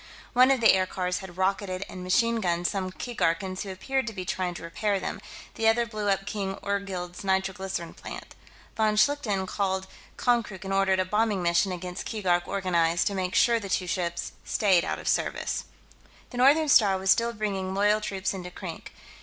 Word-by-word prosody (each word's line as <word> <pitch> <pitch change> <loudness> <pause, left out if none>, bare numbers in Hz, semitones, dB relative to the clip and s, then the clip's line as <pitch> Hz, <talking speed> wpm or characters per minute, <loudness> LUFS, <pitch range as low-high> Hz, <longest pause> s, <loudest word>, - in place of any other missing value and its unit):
One 255 +1 +6
of 270 -3 +3
the 225 - +7
aircars 185 -1 0
had 185 -2 -10
rocketed 190 0 -1
and 185 - -8
machine 230 +5 +2
gunned 175 -2 0
some 185 0 -1
Keegarkans 185 -4 -2
who 200 - -5
appeared 260 +7 -2
to 225 - -4
be 185 -2 -5
trying 180 -1 -2
to - - -8
repair 200 +4 -1
them; - - -5 0.3
the 225 - 0
other 235 +1 +4
blew 215 -3 -3
up 195 0 +1
King 200 -2 -3
Orgzild's 195 -3 -3
nitroglycerine 190 -2 -1
plant. - - -9 0.4
Von 215 -1 +2
Schlichten 215 -4 +2
called 190 -1 -1 0.3
Konkrook 225 -5 0
and 195 - -2
ordered 195 -1 +3
a 185 - +2
bombing 210 -1 +1
mission 175 +3 +2
against 180 0 -5
Keegark 180 -5 0
organized, 175 -3 +1
to 205 - 0
make 185 0 -2
sure 235 -1 +4
the 200 -3 -7
two 185 - 0
ships 175 -1 -2
stayed 190 -5 +3
out - - -2
of - - -9
service. - - -1 0.7
The 245 - -7
Northern 290 +5 +5
Star 205 -9 +5
was 190 0 +2
still 235 0 +3
bringing 195 -4 -3
loyal 210 +2 +3
troops 195 -2 -2
into 180 -2 -6
Krink. 180 -2 -8
195 Hz, 185 wpm, -27 LUFS, 185-215 Hz, 0.7 s, the